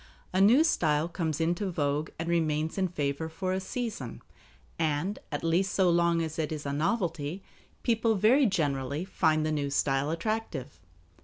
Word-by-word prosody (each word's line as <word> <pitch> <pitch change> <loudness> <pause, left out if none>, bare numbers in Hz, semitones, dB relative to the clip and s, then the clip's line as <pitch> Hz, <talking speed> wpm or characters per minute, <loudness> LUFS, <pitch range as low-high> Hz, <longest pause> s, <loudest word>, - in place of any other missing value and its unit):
A 185 - +3
new 235 +10 +6
style 155 - +2
comes 165 -3 -2
into 175 +4 0
vogue 150 -2 -1
and 165 - -4
remains 160 0 0
in 190 - +2
favor 150 -1 -2
for 185 +3 -2
a 190 - 0
season, 190 - -5 0.6
and, 160 +5 0
at 145 - -3
least 175 +3 +1
so 185 -3 +4
long 170 -1 +3
as 160 0 -5
it 155 -1 -1
is 150 -2 -4
a 140 - -2
novelty, 165 0 -1 0.4
people 225 -1 +2
very 240 +7 +5
generally 145 -4 -1
find 155 -5 +1
the 155 - 0
new 145 -2 -1
style 140 0 +1
attractive. 165 - -3
165 Hz, 165 wpm, -29 LUFS, 150-190 Hz, 0.6 s, new